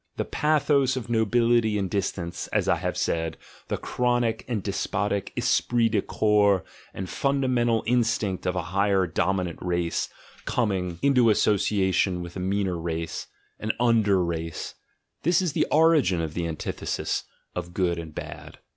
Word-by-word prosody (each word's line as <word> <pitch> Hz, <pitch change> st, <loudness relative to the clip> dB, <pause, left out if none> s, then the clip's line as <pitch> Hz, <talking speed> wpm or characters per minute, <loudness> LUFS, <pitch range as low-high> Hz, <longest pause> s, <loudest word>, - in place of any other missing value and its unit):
The -, -, -1 dB
pathos 145 Hz, -3 st, +2 dB
of 120 Hz, -2 st, -5 dB
nobility 115 Hz, -1 st, +3 dB
and 100 Hz, -2 st, -1 dB
distance, 90 Hz, -3 st, -3 dB
as -, -, 0 dB
I -, -, +3 dB
have -, -, -3 dB
said, 80 Hz, -1 st, -1 dB, 0.3 s
the -, -, -2 dB
chronic 120 Hz, -2 st, 0 dB
and 115 Hz, -6 st, -2 dB
despotic 100 Hz, 0 st, -1 dB
esprit 120 Hz, -2 st, +2 dB
dc 105 Hz, -3 st, 0 dB
corps 105 Hz, -3 st, +3 dB, 0.3 s
and 95 Hz, -, -5 dB
fundamental 125 Hz, -3 st, +1 dB
instinct 115 Hz, -6 st, 0 dB
of 90 Hz, -, 0 dB
a 90 Hz, -, -1 dB
higher 100 Hz, -1 st, +3 dB
dominant 90 Hz, +1 st, -1 dB
race 85 Hz, -1 st, -1 dB, 0.4 s
coming 95 Hz, -7 st, -1 dB
into 125 Hz, -4 st, +5 dB
association 95 Hz, -3 st, +2 dB
with 85 Hz, 0 st, -9 dB
a -, -, -4 dB
meaner 95 Hz, -1 st, -1 dB
race, 80 Hz, 0 st, -4 dB, 0.3 s
an 110 Hz, 0 st, -1 dB
"under 110 Hz, -6 st, +3 dB
race," 85 Hz, -1 st, -4 dB, 0.5 s
this 170 Hz, +2 st, +3 dB
is 180 Hz, -5 st, -1 dB
the -, -, +1 dB
origin 155 Hz, -, +4 dB
of 80 Hz, -2 st, -3 dB
the 85 Hz, -1 st, -2 dB
antithesis 80 Hz, -1 st, -3 dB, 0.3 s
of 90 Hz, -1 st, -5 dB
good 85 Hz, -3 st, +1 dB
and 80 Hz, -2 st, -8 dB
bad. -, -, -8 dB
100 Hz, 145 wpm, -26 LUFS, 90-120 Hz, 0.5 s, into